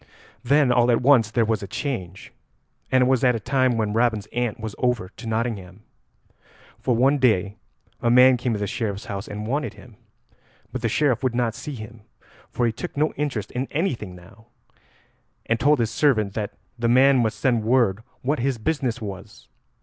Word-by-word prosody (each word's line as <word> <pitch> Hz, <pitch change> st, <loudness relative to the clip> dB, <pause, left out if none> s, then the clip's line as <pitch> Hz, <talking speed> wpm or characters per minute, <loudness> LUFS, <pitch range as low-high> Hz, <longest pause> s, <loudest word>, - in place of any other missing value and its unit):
Then 140 Hz, +1 st, +3 dB
all 120 Hz, 0 st, +3 dB
at 120 Hz, 0 st, +2 dB
once 125 Hz, -5 st, +5 dB
there 115 Hz, 0 st, +1 dB
was 110 Hz, -1 st, 0 dB
a 100 Hz, -, -6 dB
change, 95 Hz, -, -5 dB, 0.6 s
and 130 Hz, -1 st, +4 dB
it -, -, +2 dB
was 130 Hz, -1 st, +2 dB
at 125 Hz, -1 st, +4 dB
a -, -, -2 dB
time 130 Hz, +2 st, +1 dB
when 105 Hz, -2 st, -1 dB
Robin's 115 Hz, -2 st, +1 dB
aunt 120 Hz, -3 st, -2 dB
was 110 Hz, -1 st, -5 dB
over 125 Hz, -7 st, 0 dB
to 115 Hz, +4 st, -11 dB
Nottingham. 110 Hz, -4 st, -3 dB, 1.0 s
For 125 Hz, -, 0 dB
one 135 Hz, +5 st, +3 dB
day 105 Hz, -5 st, +2 dB, 0.4 s
a 120 Hz, -, +1 dB
man 125 Hz, +2 st, +7 dB
came 120 Hz, 0 st, -1 dB
to 105 Hz, -, -2 dB
the 100 Hz, -, -1 dB
Sheriff's 100 Hz, -1 st, -3 dB
house 100 Hz, +1 st, -5 dB
and 105 Hz, +1 st, -6 dB
wanted 145 Hz, +6 st, -2 dB
him. 120 Hz, -4 st, -16 dB, 0.7 s
But 130 Hz, -, -5 dB
the 115 Hz, -, 0 dB
Sheriff 130 Hz, -1 st, +1 dB
would 130 Hz, -3 st, -1 dB
not 120 Hz, -2 st, 0 dB
see 145 Hz, +4 st, -7 dB
him, 110 Hz, 0 st, -10 dB, 0.5 s
for 120 Hz, -, -1 dB
he 115 Hz, -, +2 dB
took 110 Hz, -, -7 dB
no 155 Hz, +2 st, +1 dB
interest 140 Hz, -8 st, -3 dB
in 130 Hz, +2 st, -3 dB
anything 130 Hz, -, -2 dB
now, 95 Hz, +5 st, -17 dB, 1.0 s
and 115 Hz, 0 st, 0 dB
told 145 Hz, +4 st, +4 dB
his 115 Hz, -3 st, 0 dB
servant 110 Hz, -9 st, +2 dB
that 105 Hz, -1 st, -4 dB, 0.2 s
the 120 Hz, -, +1 dB
man 130 Hz, +2 st, +5 dB
must 110 Hz, -3 st, 0 dB
send 120 Hz, -3 st, +1 dB
word 110 Hz, -4 st, +2 dB, 0.2 s
what 145 Hz, +4 st, 0 dB
his 130 Hz, 0 st, 0 dB
business 130 Hz, -2 st, -2 dB
was. 100 Hz, -3 st, -9 dB
120 Hz, 190 wpm, -23 LUFS, 110-130 Hz, 1.0 s, man